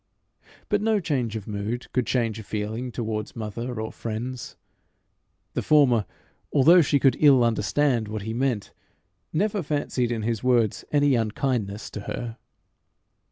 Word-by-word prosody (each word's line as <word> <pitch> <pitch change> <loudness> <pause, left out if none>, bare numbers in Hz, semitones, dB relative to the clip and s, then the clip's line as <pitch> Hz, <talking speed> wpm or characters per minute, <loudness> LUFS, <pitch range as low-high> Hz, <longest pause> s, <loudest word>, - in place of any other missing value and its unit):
But 205 -1 +1
no 220 -1 +2
change 130 - -1
of 110 -3 -6
mood 105 +3 -3
could 125 -3 0
change 115 -3 0
a - - -7
feeling 110 +4 -4
towards 110 -3 -4
mother 115 +2 -4
or 110 0 -4
friends. 115 +2 -5 1.0
The - - -1
former, 130 -8 +4 0.4
although 165 +6 +7
she 145 -2 +2
could 135 -1 +3
ill 140 -5 +6
understand 115 +2 +1
what 105 -1 -5
he 110 +2 -4
meant, 120 -4 -1 0.6
never 200 +4 0
fancied 145 -5 -1
in 115 -2 -2
his 115 0 -2
words 120 -4 +2
any 145 -1 +3
unkindness 110 -2 -1
to - - -6
her. 115 -2 -5
120 Hz, 145 wpm, -25 LUFS, 110-135 Hz, 1.0 s, although